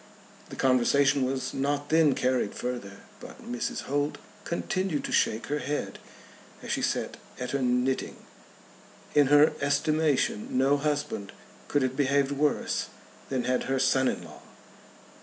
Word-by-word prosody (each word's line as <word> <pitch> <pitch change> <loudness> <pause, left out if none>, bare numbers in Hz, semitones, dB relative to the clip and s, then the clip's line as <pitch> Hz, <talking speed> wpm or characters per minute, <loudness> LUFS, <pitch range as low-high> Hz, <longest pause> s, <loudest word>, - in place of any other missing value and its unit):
The - - -8
conversation 135 +2 +3
was 130 0 -2
not 145 +1 -1
then 160 -3 +4
carried 130 -5 0
further, 120 -6 -5 0.2
but - - -12
Mrs. 120 0 -3
Holt 145 +2 -1 0.3
continued 175 -2 -2
to - - -4
shake 110 +1 +1
her 150 +1 -2
head 145 0 -3 0.6
as - - -5
she - - 0
sate - - -1 0.2
at 125 - -4
her 140 - -1
knitting. 125 +1 0 1.0
In 145 -2 +5
her 145 +2 +6
estimation 145 -5 +1
no 135 +2 +4
husband 145 -8 -2 0.3
could 145 -2 +1
have 130 0 -1
behaved 140 0 +2
worse 145 +1 0 0.4
than 130 -2 -1
had 125 0 0
her 135 0 0
son 130 0 +3
in - - -2
law. - - -12
140 Hz, 140 wpm, -28 LUFS, 130-145 Hz, 1.0 s, her